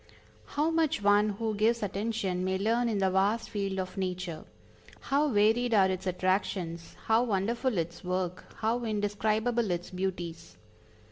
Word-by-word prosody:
How 305 Hz, +3 st, +3 dB
much 320 Hz, -8 st, +1 dB
one 205 Hz, +1 st, +5 dB
who 225 Hz, -1 st, -1 dB
gives 220 Hz, +2 st, +2 dB
attention 195 Hz, -2 st, -2 dB
may 190 Hz, 0 st, 0 dB
learn 230 Hz, +4 st, +1 dB
in 215 Hz, -, 0 dB
the 190 Hz, -1 st, +2 dB
vast 205 Hz, +4 st, +1 dB
field 195 Hz, -2 st, -2 dB
of 185 Hz, +1 st, -4 dB
Nature! 180 Hz, -3 st, -3 dB, 0.5 s
How 290 Hz, +2 st, +1 dB
varied 225 Hz, +2 st, +3 dB
are 190 Hz, -2 st, +5 dB
its 185 Hz, 0 st, -4 dB
attractions, 185 Hz, -2 st, -1 dB
how 225 Hz, +1 st, +4 dB
wonderful 230 Hz, +2 st, 0 dB
its 170 Hz, +1 st, -3 dB
work, 180 Hz, 0 st, -2 dB
how 230 Hz, +2 st, 0 dB
indescribable 215 Hz, +2 st, 0 dB
its 175 Hz, 0 st, -3 dB
beauties! 180 Hz, -3 st, -4 dB
205 Hz, 145 wpm, -29 LUFS, 185-225 Hz, 0.5 s, one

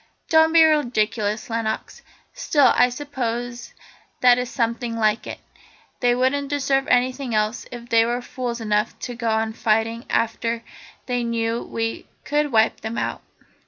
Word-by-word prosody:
"Don't 320 Hz, -1 st, +5 dB
be 330 Hz, 0 st, +7 dB
ridiculous, 230 Hz, -6 st, 0 dB
Lenox. 225 Hz, -2 st, -3 dB, 0.3 s
Still, 285 Hz, -5 st, +3 dB
I 245 Hz, -, +5 dB
suppose 245 Hz, -3 st, -5 dB, 0.5 s
that 250 Hz, -1 st, +6 dB
is 250 Hz, -1 st, -3 dB
something 230 Hz, 0 st, -2 dB
like 215 Hz, -1 st, +1 dB
it. -, -, -6 dB, 0.6 s
They 245 Hz, -1 st, +3 dB
wouldn't 270 Hz, +3 st, 0 dB
deserve 275 Hz, -2 st, 0 dB
anything 255 Hz, 0 st, +1 dB
else 215 Hz, +2 st, -1 dB
if 240 Hz, -1 st, -8 dB
they 230 Hz, -1 st, +4 dB
were 240 Hz, +1 st, -2 dB
fools 245 Hz, -1 st, -4 dB
enough 210 Hz, 0 st, 0 dB
to 245 Hz, -, -6 dB
go 235 Hz, -1 st, -2 dB
on 220 Hz, 0 st, 0 dB
fighting 225 Hz, +1 st, 0 dB
after 230 Hz, 0 st, -1 dB, 0.4 s
they 245 Hz, -1 st, -1 dB
knew 230 Hz, 0 st, -1 dB
we 225 Hz, 0 st, -4 dB, 0.2 s
could 295 Hz, 0 st, 0 dB
wipe 220 Hz, -1 st, +2 dB
them 220 Hz, +1 st, -5 dB
out." -, -, -2 dB
240 Hz, 150 wpm, -22 LUFS, 225-255 Hz, 0.6 s, be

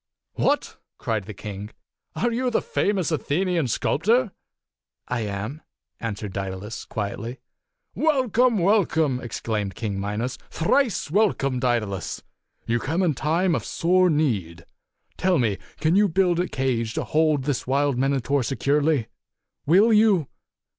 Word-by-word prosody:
"What!" -, -, 0 dB, 0.2 s
cried 110 Hz, -4 st, -2 dB
the 110 Hz, -, -7 dB
king. 100 Hz, 0 st, -7 dB, 0.5 s
"Are 240 Hz, -, 0 dB
you 250 Hz, +2 st, 0 dB
the 235 Hz, -, +1 dB
fa 205 Hz, -, 0 dB
mous 185 Hz, -5 st, -1 dB
Athenian 165 Hz, +1 st, 0 dB
sculptor?" 215 Hz, -, +1 dB, 0.4 s
" -, -, -68 dB, 0.3 s
I 125 Hz, -, -1 dB
am," 105 Hz, +7 st, -4 dB, 0.4 s
answered 105 Hz, -3 st, -4 dB
Daedalus, 95 Hz, +2 st, -5 dB
quietly. 110 Hz, +4 st, -4 dB, 0.6 s
"Welcome! 255 Hz, -6 st, +2 dB
Welcome!" 170 Hz, -8 st, +2 dB
exclaimed 105 Hz, -4 st, -3 dB
King 105 Hz, -2 st, -3 dB
Mi 105 Hz, +1 st, -3 dB
270 115 Hz, -, -1 dB
nos. 125 Hz, 0 st, -3 dB
"Thrice 210 Hz, -, +1 dB
welcome, 155 Hz, -, +2 dB
Daedalus! 115 Hz, -7 st, -1 dB, 0.4 s
You 120 Hz, +1 st, +1 dB
come 165 Hz, +9 st, -1 dB
in 170 Hz, -4 st, +2 dB
time 165 Hz, +6 st, +1 dB
of -, -, -1 dB
sore 180 Hz, +2 st, +2 dB
need. 105 Hz, -, -1 dB, 0.5 s
Tell 185 Hz, -1 st, +2 dB
me, 110 Hz, -7 st, 0 dB, 0.2 s
can 160 Hz, +3 st, +2 dB
you 205 Hz, +1 st, +5 dB
build 175 Hz, 0 st, +2 dB
a 180 Hz, -, +1 dB
cage 120 Hz, -6 st, -1 dB
to -, -, -1 dB
hold 155 Hz, -3 st, +2 dB
this 140 Hz, -3 st, -2 dB
wild 140 Hz, -1 st, +1 dB
Minotaur 135 Hz, +1 st, +1 dB
securely? 140 Hz, +1 st, +1 dB, 0.6 s
Will 200 Hz, +8 st, +5 dB
you?" 210 Hz, -9 st, +4 dB
140 Hz, 140 wpm, -24 LUFS, 115-180 Hz, 0.6 s, you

